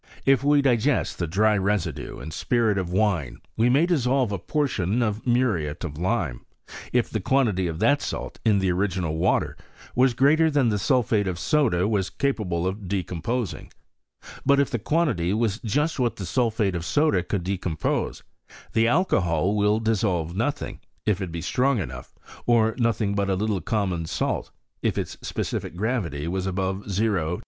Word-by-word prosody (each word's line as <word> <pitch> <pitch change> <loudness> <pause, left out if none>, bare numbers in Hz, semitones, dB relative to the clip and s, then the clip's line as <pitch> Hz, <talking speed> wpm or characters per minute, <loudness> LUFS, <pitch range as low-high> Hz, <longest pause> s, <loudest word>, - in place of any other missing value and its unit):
If 135 -1 +4
we 145 0 +4
digest 130 +1 +1
the 85 - -1
dry 105 +6 +3
residue 100 -1 -2
in 80 - -7
spirit 110 +3 +1
of 90 -2 -3
wine, 90 - 0 0.2
we 115 +2 +3
may 140 +7 +4
dissolve 135 - +1
a 100 - -2
portion 120 - 0
of 110 +1 -2
muriate 105 - +1
of 80 -5 -5
lime, 90 - -1 0.5
if 125 -1 +2
the 110 - -3
quantity 105 -4 +1
of 80 -1 -4
that 145 - +3
salt - - -5
in 110 -3 +4
the 95 -2 +1
original 90 -3 -1
water - - +1 0.4
was 125 -1 +3
greater 155 +5 +4
than 145 -5 +2
the 105 -1 0
sulphate 110 -3 +2
of 90 -2 -2
soda 110 - +2
was 100 -4 0
capable 100 -11 -1
of 95 +1 -3
decomposing: 100 +4 -3 0.7
but 140 0 +4
if 140 - +1
the 120 - -1
quantity 110 - +1
was 110 -2 0
just 145 +8 -1
what 120 -4 +1
the 95 - -6
sulphate 110 0 +1
of 85 -2 -3
soda 145 - +2
could 95 0 -3
decompose, 90 -4 -2 0.5
the 115 0 +3
alcohol 100 - +2
will 105 +1 +2
dissolve 95 -7 0
nothing, 120 +8 -2 0.3
if 105 -2 +1
it 90 -3 -4
be 85 0 -4
strong 125 +9 +1
enough, 65 - -6 0.3
or 115 -2 +4
nothing 110 -4 +1
but 100 -1 0
a 95 - +2
little 105 -1 -1
common 90 -4 -1
salt, - - -2 0.3
if - - 0
its - - -4
specific - - -4
gravity 90 - -2
was 95 +2 -2
above 95 0 -1
0*820. 95 -5 0
105 Hz, 170 wpm, -25 LUFS, 90-120 Hz, 0.7 s, If